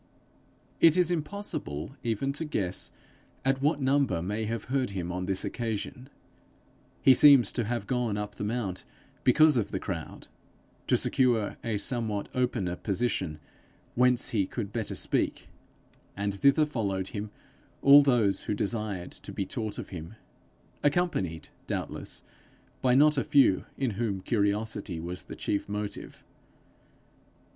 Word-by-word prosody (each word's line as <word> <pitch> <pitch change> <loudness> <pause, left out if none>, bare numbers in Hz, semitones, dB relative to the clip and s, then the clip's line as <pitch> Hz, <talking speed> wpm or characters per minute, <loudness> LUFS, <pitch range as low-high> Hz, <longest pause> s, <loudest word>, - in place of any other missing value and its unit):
It 165 +1 +6
is 180 -1 +3
impossible 150 - -4
even 120 +3 -1
to 150 - -3
guess 100 - -3 0.6
at 135 0 +2
what 150 +1 +2
number 135 -9 +2
may 105 +4 -2
have 115 +1 -3
heard 130 0 -1
him 90 -3 -4
on 90 +1 -3
this 95 -1 0
occasion: 120 +3 -4 0.9
he 135 - +8
seems 135 -4 +7
to 120 - -1
have 120 +2 -2
gone 120 -5 -1
up 105 0 -4
the - - -6
mount 105 -4 -2 0.4
because 150 +3 +5
of 110 - 0
the - - -3
crowd - - -6 0.6
to - - +4
secure 120 -5 +1
a 115 -3 -1
somewhat 110 -2 -2
opener 120 -8 0
position 95 -6 -2 0.5
whence 125 0 +3
he 100 -5 +1
could 105 -4 -5
better 115 -3 -2
speak; - - -1 0.7
and 100 0 -1
thither 140 +3 +5
followed 100 -9 -2
him 105 0 -5 0.5
those 125 -8 +6
who 105 - -2
desired 100 -4 -2
to - - -9
be 100 - -3
taught 110 0 -4
of - - -6
him, 85 +2 -8 0.7
accompanied 145 - 0 0.2
doubtless - - -4 0.6
by 125 -1 +3
not 150 +1 +5
a - - 0
few 135 -10 +4
in 130 -4 0
whom 105 -2 -2
curiosity 105 -3 -1
was 90 +2 -6
the - - -8
chief 100 0 -2
motive. 105 0 -5
115 Hz, 140 wpm, -28 LUFS, 100-135 Hz, 0.9 s, he